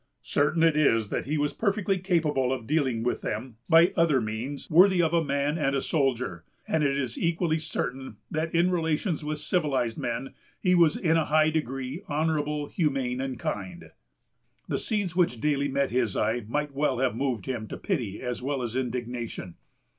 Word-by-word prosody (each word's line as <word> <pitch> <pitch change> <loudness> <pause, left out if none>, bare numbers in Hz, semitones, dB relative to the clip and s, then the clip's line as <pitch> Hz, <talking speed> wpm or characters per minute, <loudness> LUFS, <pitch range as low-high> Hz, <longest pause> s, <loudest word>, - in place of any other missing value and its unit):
Certain 155 +3 +1
it 165 -2 +4
is, 115 -8 +2
that - - -2
he 155 +2 0
was 145 0 0
perfectly 200 -3 0
capable 155 -8 +1
of 130 -4 -3
dealing 130 -5 0
with 125 - -1
them 115 +1 -4
by 165 +1 +6
other 165 -6 +3
means, 115 +5 -4
worthy 185 +3 +6
of 165 -1 +2
a 170 -1 +3
man 140 +2 0
and 140 -2 +1
a - - +2
soldier; 130 - -1 0.2
and 160 -1 +1
it 140 -1 +1
is 130 -4 -3
equally 165 -1 +1
certain, 130 -7 -4
that 160 +1 -1
in 175 +2 +3
relations 160 0 0
with 150 0 -2
civilized 145 -8 0
men 120 +3 -3 0.3
he 180 - +2
was 170 -3 +4
in 165 -1 +2
a 160 - +2
high 155 +1 +3
degree 135 0 -3
honorable, 150 -1 0
humane, 135 -6 -1
and 135 -2 -3
kind. 95 -5 -5 0.8
The - - -1
scenes 205 -6 -2
which 170 -10 +2
daily 140 +1 +1
met 140 0 0
his 120 -5 0
eye 110 +1 0
might 150 +4 -2
well 135 -2 +1
have 125 -3 +1
moved 125 -6 -2
him 115 -4 -3
to - - -6
pity 120 - -3
as 125 -1 -3
well 135 0 -2
as 120 0 -4
indignation. 120 -6 -4
145 Hz, 185 wpm, -27 LUFS, 125-160 Hz, 0.8 s, by